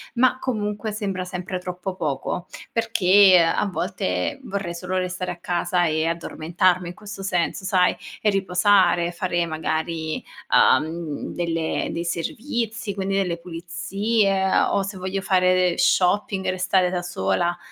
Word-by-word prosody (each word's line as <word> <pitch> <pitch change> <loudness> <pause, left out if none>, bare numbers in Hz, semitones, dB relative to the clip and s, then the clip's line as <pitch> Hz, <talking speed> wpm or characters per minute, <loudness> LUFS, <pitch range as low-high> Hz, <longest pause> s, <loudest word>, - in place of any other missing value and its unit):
ma 255 +1 +3
comunque 210 -4 -2
sembra 195 -3 -3
sempre 180 0 -4
troppo 180 +1 -5
poco. 155 +1 -3 0.2
Perché 200 -4 +5
a 165 - +1
volte, 170 - -2
vorrei 195 -3 -4
solo 180 +2 -4
restare 185 0 -2
a 175 - -7
casa 175 +1 0
e 155 0 +1
addormentarmi 170 +2 0
in 175 - -9
questo 210 0 -9
senso, 180 0 -1
sai, 185 -1 +3 0.3
riposare, 185 -3 +3
fare 175 0 -1
magari, 160 0 -2 0.5
uhm, 155 +2 +2
delle 165 -2 -1
dei 170 +1 -3
servizi, 220 - -3
quindi 195 0 -1
delle 180 -3 0
pulizie 195 +4 -1 0.2
o - - +1
se 195 +1 -5
voglio 185 +1 -3
fare 185 -1 +3
del 180 -1 +2
shopping, 190 +1 +2
restare 185 0 +2
da 180 -1 -1
sola. 175 - -1
180 Hz, 130 wpm, -23 LUFS, 170-195 Hz, 0.5 s, Perché